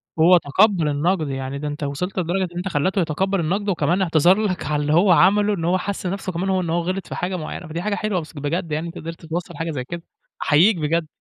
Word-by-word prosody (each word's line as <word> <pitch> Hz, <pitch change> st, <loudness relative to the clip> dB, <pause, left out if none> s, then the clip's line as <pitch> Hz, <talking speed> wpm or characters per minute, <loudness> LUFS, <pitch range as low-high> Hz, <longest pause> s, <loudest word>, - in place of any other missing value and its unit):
وهو 170 Hz, +3 st, +6 dB
تقبَّل 175 Hz, +2 st, +2 dB
النَقد. 155 Hz, +3 st, 0 dB
يعني 135 Hz, +1 st, -4 dB
ده 150 Hz, -, -4 dB
أنت 145 Hz, +1 st, -5 dB
وصلت 165 Hz, +7 st, -3 dB
لدرجة 180 Hz, +2 st, 0 dB
إن 175 Hz, -, -9 dB
أنت 180 Hz, +2 st, -3 dB
خلّيته 185 Hz, +4 st, 0 dB
يتقبَّل 190 Hz, +4 st, 0 dB
النَقد 195 Hz, +6 st, -1 dB
وكمان 180 Hz, 0 st, +1 dB
اعتذر 175 Hz, +1 st, +4 dB
لك 190 Hz, -5 st, -2 dB
على 150 Hz, -1 st, 0 dB
اللي 150 Hz, +1 st, 0 dB
هو 180 Hz, +4 st, +5 dB
عمله، 205 Hz, +4 st, +4 dB
إن 170 Hz, -5 st, -3 dB
هو 180 Hz, +2 st, +2 dB
حِس 200 Hz, +1 st, -4 dB
نفسه 190 Hz, +1 st, -3 dB
كمان 180 Hz, +3 st, -2 dB
هو 190 Hz, -1 st, +1 dB
إن 170 Hz, -, -3 dB
هو 170 Hz, +1 st, +1 dB
غِلط 185 Hz, +3 st, -3 dB
في -, -, -6 dB
حاجة 180 Hz, +1 st, -2 dB
معيّنة. 175 Hz, +1 st, -6 dB
فدي 165 Hz, +2 st, -4 dB
حاجة 205 Hz, +2 st, -1 dB
حلوة 210 Hz, -3 st, -1 dB
بس 155 Hz, -, -12 dB
بجد 155 Hz, +4 st, -3 dB
يعني 150 Hz, -, 0 dB
إن 165 Hz, -, -8 dB
أنت -, -, -7 dB
قدرت 165 Hz, +1 st, -8 dB
توصّل 170 Hz, +2 st, -5 dB
حاجة 165 Hz, 0 st, -3 dB
زي 135 Hz, -5 st, -3 dB
كده، 170 Hz, +6 st, -7 dB, 0.4 s
أحيّيك 175 Hz, +7 st, +4 dB
بجد. 160 Hz, +1 st, 0 dB
175 Hz, 250 wpm, -22 LUFS, 155-190 Hz, 0.4 s, وهو